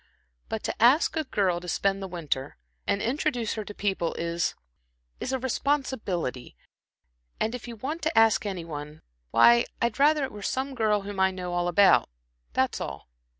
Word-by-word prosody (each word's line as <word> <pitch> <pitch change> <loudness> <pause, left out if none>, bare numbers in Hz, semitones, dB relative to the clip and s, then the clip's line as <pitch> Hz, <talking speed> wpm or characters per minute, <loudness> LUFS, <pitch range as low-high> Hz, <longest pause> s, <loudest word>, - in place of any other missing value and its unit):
But - - -3
to - - -1
ask 265 +8 +5
a 315 -1 -1
girl 190 -8 +1
to 180 - -10
spend 195 +2 0
the 195 - -4
winter, 155 - -3 0.3
and 200 - +1
introduce 245 -3 0
her 215 - -4
to 205 - -8
people, 190 -4 -1
is 170 0 -1 0.6
is 260 - -3
a 265 - +1
responsibility; 245 - -2 0.8
and 225 - 0
if 250 -1 -6
you 235 - -7
want 290 +9 -4
to 315 -3 -1
ask 225 -1 +5
any 190 -5 -4
one 150 -1 -8 0.3
why, 120 - +6
I'd 235 0 -1
rather 300 +1 +4
it 265 - -3
were 205 - -9
some 265 +6 -2
girl 215 -4 +1
whom 200 -1 -6
I 190 0 +5
know 180 -1 -5
all 175 0 0
about 190 - +5 0.4
that's - - 0
all." - - -6
205 Hz, 180 wpm, -27 LUFS, 175-250 Hz, 0.8 s, why